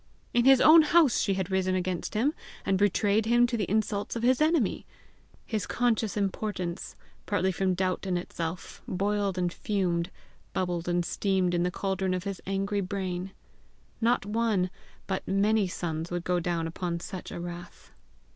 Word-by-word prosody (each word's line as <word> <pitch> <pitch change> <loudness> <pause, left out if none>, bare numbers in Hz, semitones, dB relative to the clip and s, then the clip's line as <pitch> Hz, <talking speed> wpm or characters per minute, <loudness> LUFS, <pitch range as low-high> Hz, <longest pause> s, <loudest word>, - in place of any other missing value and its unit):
In 240 0 +3
his 270 -1 +7
own 320 +4 +8
house 310 -4 +4
she 195 - +1
had 190 0 -3
risen 185 0 +1
against 185 +1 -2
him, 265 +8 +2 0.3
and 195 - +2
betrayed 205 +2 +2
him 240 +1 +5
to 240 0 -1
the 205 -6 -2
insults 210 0 0
of 230 - -3
his 255 +3 +3
enemy! 310 - +2 0.6
His 215 -4 -2
conscious 225 -3 0
importance, 195 -3 -3 0.3
partly 190 -2 +1
from 185 0 0
doubt 185 +1 -1
in 180 -1 +1
itself, 170 -1 -5
boiled 200 0 0
and 175 -1 0
fumed, 180 -4 -1 0.4
bubbled 175 -2 -2
and 175 0 +1
steamed 190 -1 0
in 175 - +1
the 180 - +1
caldron 190 0 -1
of 180 - -3
his 195 -1 -5
angry 195 +1 0
brain. 185 -1 -3 0.7
Not 235 -2 +2
one, 210 -4 0 0.3
but 190 -1 -3
many 205 +1 +2
suns 165 -2 -4
would 175 -1 -3
go 180 0 +1
down 170 -1 -1
upon 170 +1 -3
such 185 +1 -7
a - - -5
wrath! 175 0 -8
190 Hz, 165 wpm, -28 LUFS, 180-215 Hz, 0.7 s, own